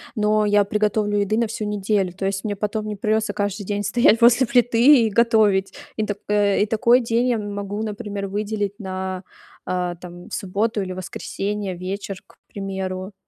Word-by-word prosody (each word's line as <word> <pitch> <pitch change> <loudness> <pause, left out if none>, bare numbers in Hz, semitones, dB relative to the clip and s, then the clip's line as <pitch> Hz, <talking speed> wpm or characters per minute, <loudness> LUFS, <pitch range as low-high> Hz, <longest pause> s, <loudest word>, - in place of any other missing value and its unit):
но 215 -1 +2
я 205 0 +3
приготовлю 210 0 0
еды 205 +2 0
на 230 0 +1
всю 220 0 -5
неделю. 205 -2 0
То 195 +2 -5
есть 195 0 -2
мне 205 -2 -2
потом 210 +1 -2
не 210 -1 -4
придётся 215 +1 0
каждый 205 0 -2
день 205 +1 -2
стоять 225 +2 +3
после 240 +2 +6
плиты 245 0 +5
и - - -1
готовить. 215 -3 +3 0.2
И 215 - -1
так, 205 -1 -3
э 205 -1 +2
и - - +1
такой 235 +3 +4
день 235 0 0
я 245 -2 +2
могу, 205 0 -4
например, 205 -2 -4
выделить 205 0 -3
на, 190 -1 -5 0.4
а, 180 -1 -2
там, 175 0 -11
субботу 205 +3 -1
или 185 -1 -4
воскресенье, 195 +2 -4
вечер, 195 +1 -5
к - - -23
примеру. 190 -1 -5
205 Hz, 175 wpm, -22 LUFS, 195-220 Hz, 0.4 s, после